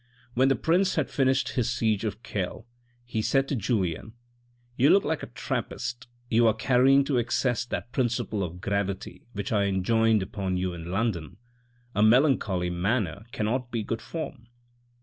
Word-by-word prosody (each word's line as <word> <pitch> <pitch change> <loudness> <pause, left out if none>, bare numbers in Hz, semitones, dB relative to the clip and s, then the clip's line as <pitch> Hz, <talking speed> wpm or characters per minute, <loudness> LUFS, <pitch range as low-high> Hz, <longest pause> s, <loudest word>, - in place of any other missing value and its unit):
When 130 +2 +3
the 135 - +3
prince 180 +3 +2
had 155 -4 0
finished 135 -1 +2
his 120 -3 0
siege 110 -3 0
of 110 +2 -4
Kehl, 100 +1 -4 0.4
he 110 -2 -2
said 135 +4 +2
to 140 - 0
Julien, 105 -3 -1 0.3
" 120 0 -37
You 135 +4 +4
look 200 - +6
like 160 +1 -1
a - - -6
Trappist, 125 +1 -4 0.2
you 115 0 +4
are 110 - +3
carrying 130 +4 +4
to 135 -3 +1
excess 120 +1 0
that 120 0 -5
principle 115 -5 -1
of 90 0 -6
gravity 100 0 -3
which 100 -1 -4
I 100 -2 +2
enjoined 110 +2 +2
upon 95 -2 -3
you 90 0 -1
in 85 0 -7
London* 95 - -2 0.6
A 105 - +1
melancholy 110 -7 +3
manner 100 +2 -1
cannot 120 +3 -1
be 115 -3 -2
good 115 +2 -3
form. 145 -7 -6
115 Hz, 170 wpm, -27 LUFS, 100-125 Hz, 0.6 s, look